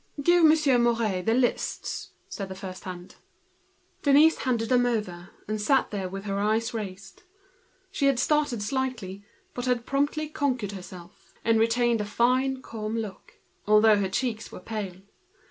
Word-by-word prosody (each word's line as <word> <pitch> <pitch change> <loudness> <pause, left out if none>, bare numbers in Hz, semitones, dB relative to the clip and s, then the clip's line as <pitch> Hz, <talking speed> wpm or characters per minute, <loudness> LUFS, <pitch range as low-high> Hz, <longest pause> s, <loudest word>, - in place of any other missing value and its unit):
"Give 345 +4 +4
Monsieur 305 -5 +5
Mouret 230 -5 +1
the 225 - +4
lists," 250 -1 -1 0.2
said 195 -2 -6
the 190 - -6
first 185 0 -8
hand. 180 -1 -8 0.8
Denise 295 +3 +5
gave 235 -3 0
them, 220 -8 0 0.2
and 215 0 -2
sat 265 +4 +2
there 195 -3 -3
with 195 +1 -6
her 200 -1 -2
eyes 220 +3 0
raised. 195 -3 -7 0.7
She 285 -8 +1
had 275 -2 +3
slightly 300 -2 +1
started, 210 -4 -3 0.3
but 245 - -4
had 245 -2 0 0.5
conquered 255 -8 -1
herself, 180 -2 -12
and 225 0 +3
retained 230 0 +2
a - - -3
fine 255 +5 +1
calm 220 0 -4
look, 215 -4 -7 0.3
although 215 0 +6
her 195 -2 0
cheeks 225 +1 -2
were - - -9
pale. 195 -2 -6
225 Hz, 145 wpm, -26 LUFS, 195-255 Hz, 0.8 s, although